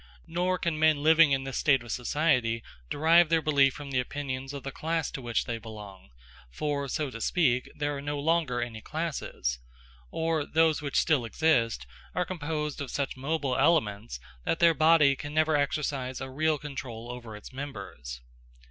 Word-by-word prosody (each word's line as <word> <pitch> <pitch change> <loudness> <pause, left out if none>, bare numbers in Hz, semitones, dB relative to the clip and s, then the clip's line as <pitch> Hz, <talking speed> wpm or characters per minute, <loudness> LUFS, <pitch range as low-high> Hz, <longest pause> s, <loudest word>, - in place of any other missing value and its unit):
Nor 180 +2 0
can 170 -4 -2
men 155 -2 +3
living 160 -1 +6
in 135 -1 +1
this 135 -2 -3
state 135 -4 +3
of 120 - -8
society 125 -4 +1 0.3
derive 165 - +5
their 165 0 +4
belief 140 -3 +4
from 145 -1 -8
the 130 - +1
opinions 135 0 -4
of 140 -2 -7
the 135 - -4
class 165 +1 -2
to 135 - -6
which 120 -2 -1
they 115 -2 -3
belong, 105 - -10 0.4
for, 140 - -2
so 145 +1 -2
to 115 - -8
speak, 130 -4 +2
there 145 0 -2
are 140 - -5
no 145 0 -3
longer 150 -6 +1
any 115 -2 -7
classes, 150 - -3 0.5
or 160 - 0
those 160 0 +2
which 140 -3 -2
still 155 -7 +2
exist 115 - +1 0.3
are 180 +1 +1
composed 150 -4 -3
of 140 - -4
such 140 +1 -2
mobile 140 0 -1
elements, 105 - +1 0.2
that - - 0
their 170 0 +5
body 155 -2 +5
can 145 +3 -7
never 155 0 +3
exercise 140 -3 -1
a 135 0 -6
real 155 +3 +1
control 125 -5 -7
over 120 -3 -8
its 105 - -11
members. 100 - -7
140 Hz, 175 wpm, -28 LUFS, 125-155 Hz, 0.5 s, living